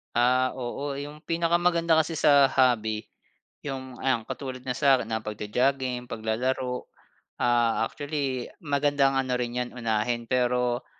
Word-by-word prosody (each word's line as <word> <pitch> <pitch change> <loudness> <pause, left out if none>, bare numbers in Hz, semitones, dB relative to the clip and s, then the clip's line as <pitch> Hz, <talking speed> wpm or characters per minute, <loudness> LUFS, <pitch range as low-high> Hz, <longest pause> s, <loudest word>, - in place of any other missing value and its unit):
Ah, 125 +2 +3
oo. 135 +3 -4
Yung 145 +2 -7
pinakamaganda 170 -1 +2
kasi 160 +1 -1
sa 145 -3 +6
hobby, 110 -5 +2 0.6
yung 130 -2 -6
ayan, 120 -4 +1
katulad 130 0 -5
ng 125 0 -4
sa'kin, 135 -2 +3
ah, 110 - -2
pag-jo-jogging, 125 +4 -1
paglalaro. 125 +3 -2 0.6
Ah, 120 -2 +2
actually 140 -4 -3 0.2
magandang 140 -2 +2
ano 130 -1 0
rin 125 0 -2
yan 125 0 -3
unahin, 115 0 -1
pero 125 -1 +1
130 Hz, 125 wpm, -26 LUFS, 120-140 Hz, 0.6 s, sa